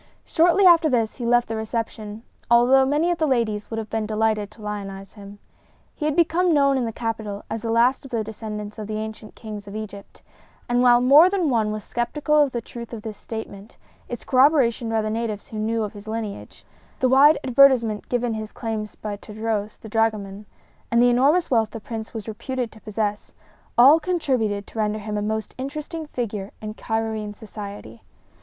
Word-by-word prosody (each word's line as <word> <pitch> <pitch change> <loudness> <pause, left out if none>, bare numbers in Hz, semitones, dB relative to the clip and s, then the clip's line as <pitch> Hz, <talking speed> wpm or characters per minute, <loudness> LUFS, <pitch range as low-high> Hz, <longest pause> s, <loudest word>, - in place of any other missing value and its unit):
Shortly 350 +4 +3
after 335 -3 +6
this 230 -4 0
he 240 -3 -3
left 240 0 +3
the 225 - -3
reception, 220 -1 -4 0.3
although 250 +3 +5
many 305 +5 +2
of 345 - -2
the 315 - +2
ladies 225 -6 0
would 225 - -4
have 220 -1 -5
been 220 -1 -1
delighted 215 -1 0
to 215 +1 -17
lionize 195 -2 -6
him. 205 -1 -12 0.6
He 300 - -5
had 305 -1 0
become 340 0 +3
known 275 -1 +4
in 255 -2 0
the 225 - -3
capital 220 -3 -4
as 225 - -3
the 230 - -4
last 240 +5 +3
of 270 - -10
the 230 -3 -1
descendants 210 -1 -7
of 210 - -5
the 215 0 -3
ancient 215 0 -7
kings 210 -3 -8
of 200 - -8
Egypt; 205 -2 -9 0.4
and 245 0 +2
while 245 -1 +6
more 290 +8 +7
than 370 -7 0
one 220 -3 +1
was 215 -1 -5
skeptical 300 +5 +1
of 285 -2 +2
the 240 - -3
truth 235 +1 -9
of 220 -2 -7
this 220 -2 -6
statement, 215 -1 -8 0.3
its 240 - -6
corroboration 255 -4 +3
by 225 -1 0
the 215 - -2
natives 220 -2 -3
who 215 - -5
knew 225 +1 0
of 210 - -5
his 205 0 -12
lineage, 215 -2 -6 0.3
the 260 - +3
wide 280 +4 +6
advertisement 250 -5 +4
given 245 -1 0
his 215 -1 -5
claims 220 -2 -5
by 210 -1 -5
Tadros, 215 0 -4
the - - -12
dragoman, 210 -2 -1 0.4
and 235 - +2
the 245 0 +5
enormous 285 +8 +3
wealth 225 -3 +3
the 225 - -7
Prince 220 0 -7
was 220 -2 -7
reputed 245 +2 -4
to 220 - -16
possess, 210 -1 -3 0.4
all 275 +7 +8
contributed 260 - -1
to 225 - -9
render 210 0 0
him 210 0 -5
a 210 - -1
most 220 +1 -3
interesting 305 +4 -5
figure 210 -7 -4
in 215 0 -6
Cairoene 220 -2 -3
society. 200 - -9
225 Hz, 195 wpm, -23 LUFS, 215-255 Hz, 0.6 s, all